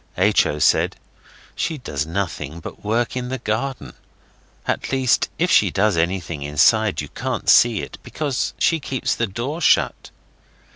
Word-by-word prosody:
H. 100 Hz, +3 st, +4 dB
O. 75 Hz, -, -3 dB
said, -, -, +2 dB, 0.6 s
'She 160 Hz, -, -2 dB
does 75 Hz, -, -4 dB
nothing 85 Hz, -4 st, -4 dB
but -, -, -10 dB
work 115 Hz, +4 st, 0 dB
in 125 Hz, -1 st, -3 dB
the 130 Hz, -, -2 dB
garden. 125 Hz, +4 st, -3 dB, 0.7 s
At -, -, -2 dB
least 130 Hz, -2 st, +2 dB
if -, -, +1 dB
she -, -, +5 dB
does 105 Hz, -1 st, +1 dB
anything 85 Hz, -2 st, -1 dB
inside 95 Hz, +10 st, +3 dB
you 75 Hz, -, -8 dB
can't 130 Hz, -, -4 dB
see 115 Hz, -4 st, +5 dB
it, -, -, -9 dB
because 145 Hz, -5 st, -3 dB
she 165 Hz, -, +2 dB
keeps 135 Hz, -3 st, -2 dB
the 115 Hz, -, -1 dB
door 125 Hz, -, -4 dB
shut. -, -, +2 dB
110 Hz, 155 wpm, -21 LUFS, 85-130 Hz, 0.7 s, she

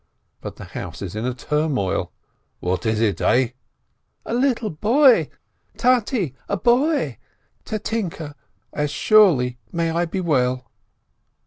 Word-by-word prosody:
But -, -, -7 dB
the -, -, -10 dB
house 85 Hz, +1 st, -7 dB
is 95 Hz, 0 st, -6 dB
in 110 Hz, +3 st, -2 dB
a 125 Hz, -, -1 dB
turmoil. 150 Hz, -8 st, -1 dB, 0.5 s
"What 90 Hz, +5 st, -2 dB
is 110 Hz, -1 st, +1 dB
it, 105 Hz, -6 st, 0 dB
eh 125 Hz, -1 st, +3 dB, 0.4 s
?" -, -, -48 dB
"A -, -, -4 dB
little 245 Hz, -3 st, +1 dB
boy! 240 Hz, -, +4 dB, 0.5 s
Tate, 235 Hz, -, +1 dB, 0.2 s
a 200 Hz, -, 0 dB
boy! 245 Hz, -, +1 dB, 0.5 s
Tatinke, 200 Hz, -8 st, -4 dB, 0.4 s
as 150 Hz, 0 st, -1 dB
surely 145 Hz, -, +4 dB
may 165 Hz, -1 st, 0 dB
I 170 Hz, +1 st, 0 dB
be 175 Hz, +3 st, -4 dB
well 130 Hz, -7 st, 0 dB
160 Hz, 130 wpm, -22 LUFS, -, 0.5 s, boy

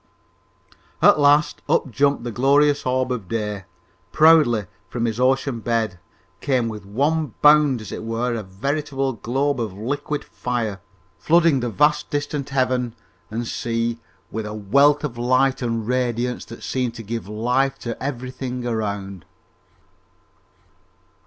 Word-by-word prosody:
At -, -, +6 dB
last, 145 Hz, +1 st, +3 dB
up 135 Hz, -, +1 dB
jumped 140 Hz, +2 st, +1 dB
the 120 Hz, -, -4 dB
glorious 140 Hz, +4 st, +3 dB
orb 130 Hz, 0 st, 0 dB
of 115 Hz, -7 st, -3 dB
day, 105 Hz, -3 st, -3 dB, 0.5 s
proudly, 150 Hz, -9 st, +5 dB, 0.2 s
from 120 Hz, -1 st, -2 dB
his 115 Hz, 0 st, -2 dB
ocean 130 Hz, -1 st, +1 dB
bed, 110 Hz, -5 st, -1 dB, 0.4 s
came 130 Hz, -5 st, 0 dB
with 105 Hz, -3 st, -8 dB
one 145 Hz, +5 st, 0 dB
bound 150 Hz, -4 st, +6 dB
as 110 Hz, -, -9 dB
it -, -, -6 dB
were, 115 Hz, +2 st, -1 dB
a 115 Hz, -, -2 dB
veritable 135 Hz, +7 st, -2 dB
globe 135 Hz, +4 st, -1 dB
of 110 Hz, -4 st, -3 dB
liquid 145 Hz, +6 st, -3 dB
fire, 115 Hz, -6 st, -3 dB, 0.4 s
flooding 165 Hz, -4 st, +4 dB
the 120 Hz, -1 st, -2 dB
vast 150 Hz, +4 st, +2 dB
distant 145 Hz, -1 st, -3 dB
heaven 130 Hz, -3 st, 0 dB, 0.3 s
and 115 Hz, +2 st, -3 dB
sea 115 Hz, 0 st, -2 dB, 0.3 s
with 110 Hz, -1 st, -4 dB
a 105 Hz, -, -6 dB
wealth 140 Hz, +8 st, +3 dB
of 120 Hz, -5 st, -4 dB
light 130 Hz, +2 st, +2 dB
and 115 Hz, -3 st, -2 dB
radiance 125 Hz, -1 st, -1 dB
that 115 Hz, -, -11 dB
seemed 125 Hz, -3 st, -2 dB
to 115 Hz, -, -7 dB
give 115 Hz, 0 st, -5 dB
life 125 Hz, +6 st, 0 dB
to 115 Hz, -1 st, -5 dB
everything 130 Hz, -1 st, -4 dB
around. 100 Hz, -5 st, -3 dB
125 Hz, 140 wpm, -22 LUFS, 115-140 Hz, 0.5 s, At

